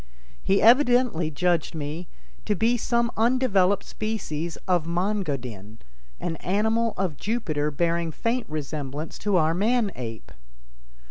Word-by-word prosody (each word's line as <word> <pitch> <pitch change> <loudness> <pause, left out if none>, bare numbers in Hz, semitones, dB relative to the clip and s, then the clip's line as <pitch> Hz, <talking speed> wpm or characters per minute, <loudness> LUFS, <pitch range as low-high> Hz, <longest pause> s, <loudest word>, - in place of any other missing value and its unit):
He 195 +1 +2
evidently 245 - +4
judged 170 +2 0
me 155 +3 -5 0.4
to 210 - +1
be 225 +5 +2
some 235 0 +1
undeveloped 215 -5 +3
species 170 -7 -4
of 175 -3 +2
Mon 190 +5 0
go 145 -7 -1
din, 110 -4 -9 0.4
an 165 -2 -3
animal 220 +5 0
of 180 -6 -1
Jupiter 165 -10 -1
bearing 170 +2 0
faint 230 +8 -1
resemblance 150 0 -5
to 205 -3 +1
our 160 -1 +3
man 215 +3 +1
ape. 115 -3 -7
180 Hz, 130 wpm, -25 LUFS, 155-220 Hz, 0.4 s, evidently